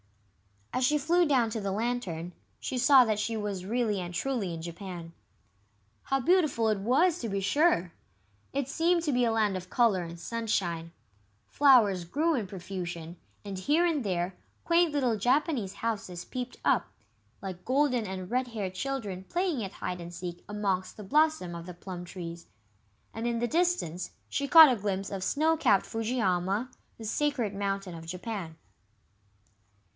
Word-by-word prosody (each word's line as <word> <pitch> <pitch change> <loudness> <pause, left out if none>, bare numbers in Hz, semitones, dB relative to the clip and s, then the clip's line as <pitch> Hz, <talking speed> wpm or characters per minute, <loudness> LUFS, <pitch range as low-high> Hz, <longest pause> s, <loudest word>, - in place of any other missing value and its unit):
As 255 - 0
she 300 +3 +3
flew 335 +4 +3
down 250 -6 +2
to 220 - -2
the 195 -1 -2
Lantern, 200 -6 -2 0.3
she 260 - -3
saw 260 0 +7
that 215 -2 0
she 225 +1 -1
was 200 -3 -3
really 220 -1 0
and 175 -1 -5
truly 230 -4 -1
in 165 - -6
Japan. 170 0 -7 0.9
How 270 - 0
beautiful 295 -7 +3
it 210 -2 +1
was, 305 - +3
to 230 - -3
be 195 0 -1
sure! 200 - +2 0.6
It 275 -1 -1
seemed 335 +4 +2
to 305 - 0
be 250 -2 +2
a 230 - +1
land 215 -3 +2
of 185 0 -9
colour 220 -7 +3
and 170 0 -8
sunshine. 175 -7 -2 0.6
Flowers 230 -10 +5
grew 310 - +1
in 230 -9 -1
profusion, 175 -3 -6 0.3
and 195 -2 -5
here 300 - +3
and 315 -6 +1
there 180 -2 -1 0.3
quaint 340 -1 +3
little 255 -6 +1
Japanese 250 - +1
houses 200 -7 -4
peeped 250 -1 -5
up, - - +3 0.5
like 185 -2 -7
golden 255 -4 +2
and 185 0 -6
red 255 +1 +1
haired 205 -6 -4
children 205 -5 -4
playing 345 - -1
at 195 - -6
hide 180 -1 -4
and 170 0 -8
seek 175 -1 -6
amongst 195 -3 -2
the 210 - -8
blossom 300 - +2
of 170 +1 -7
the 180 - -8
plum 180 0 -7
trees. 170 -2 -8 0.7
And 225 +1 -3
in 235 -1 0
the 240 +1 0
distance 330 - 0 0.2
she 280 - -1
caught 320 -2 +10
a 240 - -1
glimpse 195 -1 -2
of 195 -2 -4
snow 315 +8 +2
capped 220 -10 +3
Fujiyama, 220 -1 -1 0.3
the 225 - -9
sacred 250 -3 0
mountain 195 -2 -2
of 165 -1 -9
Japan. 180 -2 -5
215 Hz, 165 wpm, -29 LUFS, 185-265 Hz, 0.9 s, caught